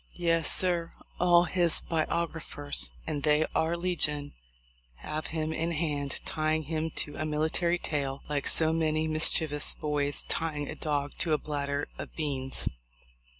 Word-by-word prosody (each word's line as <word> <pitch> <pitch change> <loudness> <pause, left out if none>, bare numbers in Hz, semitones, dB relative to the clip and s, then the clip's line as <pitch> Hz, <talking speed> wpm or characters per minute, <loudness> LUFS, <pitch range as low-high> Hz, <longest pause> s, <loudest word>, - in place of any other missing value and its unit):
Yes, 165 -2 +3
sir, 175 -2 0 0.3
all 175 -1 +6
his 175 -1 +2
biographers 160 -3 0 0.2
(and 150 -3 -2
they 150 +1 +4
are 165 +2 +1
legion) 155 -5 -1 0.6
have 155 - -4
him 160 -1 -2
in 165 +2 -1
hand, 145 -3 -1
tying 155 0 0
him 160 +1 -2
to 145 - -4
a - - -1
military 160 +3 +1
tail, 140 -5 -2
like 145 -2 -1
so 160 0 +5
many 160 -1 +1
mischievous 155 -1 +1
boys 145 -1 +1
tying 150 -3 -2
a - - -4
dog 145 -2 -1
to 160 - +2
a - - +4
bladder 145 -1 -2
of - - -7
beans. 135 -4 -3
155 Hz, 145 wpm, -29 LUFS, 145-165 Hz, 0.6 s, all